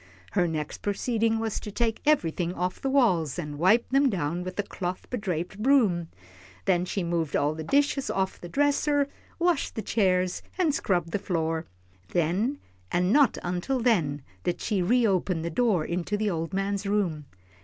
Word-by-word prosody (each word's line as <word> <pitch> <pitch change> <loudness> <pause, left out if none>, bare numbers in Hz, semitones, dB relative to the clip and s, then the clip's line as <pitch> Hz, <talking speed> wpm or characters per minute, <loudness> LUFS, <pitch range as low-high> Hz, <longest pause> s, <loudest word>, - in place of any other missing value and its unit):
Her 180 -3 +2
next 155 -2 -4
proceeding 225 +2 0
was 225 -1 -2
to 210 - -7
take 225 +1 -1
everything 175 - +2
off 180 +1 -2
the 270 - 0
walls, 185 - +2
and 150 -4 -5
wipe 215 +8 +4
them 275 +1 +4
down 175 -3 -2
with 185 0 -6
a 205 - +1
cloth 180 -2 -5
bedraped 195 -5 -3
broom. 215 -10 +3 0.6
Then 180 0 +2
she 190 +1 -2
moved 170 -3 -1
all 145 +2 +2
the 160 0 -6
dishes 280 - +1
off 190 0 -1
the 175 - -7
dresser, 285 - +2 0.3
washed 345 -3 +1
the 220 - -3
chairs, 185 -4 +1 0.2
and 340 -6 +2
scrubbed 175 - 0
the 205 - 0
floor. 165 -3 -1 0.5
Then, 185 - +1 0.3
and 180 +3 +2
not 285 -2 +4
until 180 +10 -1
then, 165 - +1 0.2
did 175 - -1
she 205 -4 0
reopen 190 -5 +2
the 170 - -3
door 195 -4 +2
into 180 +4 -2
the 210 -1 0
old 165 -1 -3
man's 195 +1 -1
room. 180 -8 0
190 Hz, 170 wpm, -27 LUFS, 170-230 Hz, 0.6 s, wipe